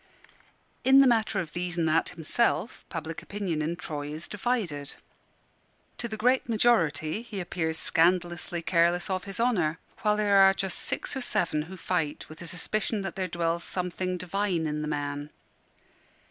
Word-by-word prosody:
In 265 +1 +7
the 275 - +8
matter 220 -4 +3
of 165 -5 -4
These 175 0 -3
an' 165 - +2
That 160 +1 +2
himself, 180 +8 0
public 165 -1 -5
opinion 190 -6 -3
in 160 +3 -1
Troy 150 -5 -5
is 155 +3 -5
divided. 195 - -2 1.0
To 235 - -1
the 220 -1 -5
great 250 +3 +2
majority 210 -6 +2
he 225 -4 -6
appears 160 -3 -2
scandalously 175 0 +1
careless 175 +2 +2
of 185 -1 -2
his 195 +1 -7
honour; 185 -10 +2 0.2
while 210 -1 +2
there 205 -1 +3
are 195 0 +7
just 190 -2 -1
six - - -2
or 265 - -2
seven 165 -10 0
who 190 - -8
fight 165 -5 -2
with 155 - -11
a 175 - -7
suspicion 205 +5 -1
that 195 - -4
there 185 -1 -1
dwells 170 0 -1
something 180 0 -2
divine 180 -2 -1
in 150 0 -2
the 150 - -3
man. 145 0 -3
180 Hz, 165 wpm, -28 LUFS, 160-205 Hz, 1.0 s, the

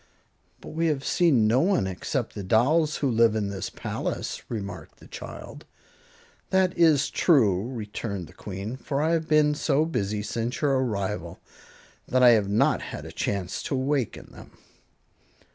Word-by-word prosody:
"But - - -10
we 165 +1 -1
have 145 -4 -1
seen 145 -11 +3
no 115 +4 +3
one 185 - +2
except 110 +6 -3
the 105 - -6
dolls 140 - +2
who 140 - 0
live 115 -1 +4
in 105 -2 -1
this 100 -1 -4
palace," - - -4
remarked 100 -8 -6
the - - -15
child. - - -9 0.9
"That 190 -1 +2
is 155 -4 +4
true," 110 - +3
returned 105 -4 -5
the - - -16
Queen, 100 +5 -6
"for 140 +1 -3
I 155 +2 +1
have 165 -1 0
been 155 -1 +4
so 150 0 +1
busy 105 -9 -2
since 115 +3 -3
your 140 -3 +2
arrival 100 -8 -3 0.7
that 130 0 +2
I 125 - +9
have 105 -4 +4
not 105 +2 +2
had - - -7
a - - -8
chance 95 -3 -3
to - - -2
awaken 135 -2 -2
them." - - -15
120 Hz, 160 wpm, -26 LUFS, 100-150 Hz, 0.9 s, I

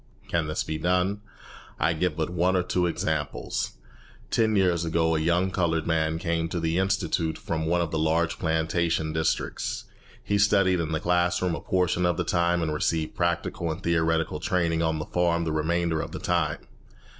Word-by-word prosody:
Can 85 -2 0
this 75 - -1
be 80 0 -4
done? 90 +4 +1 0.6
I 80 +4 +2
give 90 +3 -1
but 80 +1 -1
one 90 +1 +2
or 90 - +2
two 90 0 +1
examples. 80 -3 -2 0.6
Ten 110 -1 +2
years 90 -4 +2
ago 80 0 +1
a - - +1
young 85 +4 +1
coloured 85 -3 0
man 80 -1 +1
came 85 -2 -1
to 85 - -2
the 80 +2 0
institute 85 -4 0
from 80 -1 -3
one 85 +1 +2
of 85 -3 -2
the 80 - -1
large 80 +1 +1
plantation 80 0 0
districts. 80 0 -1 0.4
He 100 0 0
studied 100 -3 +4
in 80 -1 -2
the 80 - 0
class 90 +1 +1
room 90 -2 0
a - - -4
portion 90 -1 +1
of 85 - 0
the 90 - 0
time, 85 0 +1
and 80 -1 -1
received 80 +1 -1
practical 85 -1 -1
and 85 +4 -6
theoretical 80 -2 +1
training 85 -1 0
on 80 -1 +1
the 75 - -4
farm 85 -1 +1
the 80 - -1
remainder 80 +1 0
of - - -7
the - - -4
time. 80 -4 0
85 Hz, 190 wpm, -26 LUFS, 80-90 Hz, 0.6 s, studied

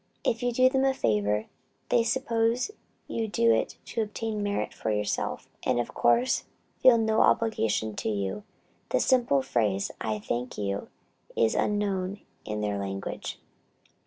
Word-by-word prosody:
If 230 - 0
you 245 0 +1
do 255 +2 +5
them 265 0 +2
a 270 0 +3
favor, 105 - +1 0.4
they 235 - +4
suppose 230 - +1 0.4
you 225 -1 -2
do 115 - +3
it 110 - -1
to 230 - -2
obtain 215 0 -3
merit 205 0 -1
for - - -3
yourself, 105 -1 -1
and - - +1
of 120 - -3
course 240 - +2 0.4
feel 250 -2 +8
no 220 -1 +2
obligation 110 - +2
to - - -1
you; 100 - -2 0.5
the - - +2
simple 240 - +3
phrase, 105 -6 0
"I 110 -1 -1
thank 120 +4 -3
you," 100 -1 -2 0.5
is 115 -1 +3
unknown 200 -2 0 0.2
in 105 0 -3
their 105 -1 -1
language. 95 0 -4
185 Hz, 150 wpm, -28 LUFS, -, 0.5 s, feel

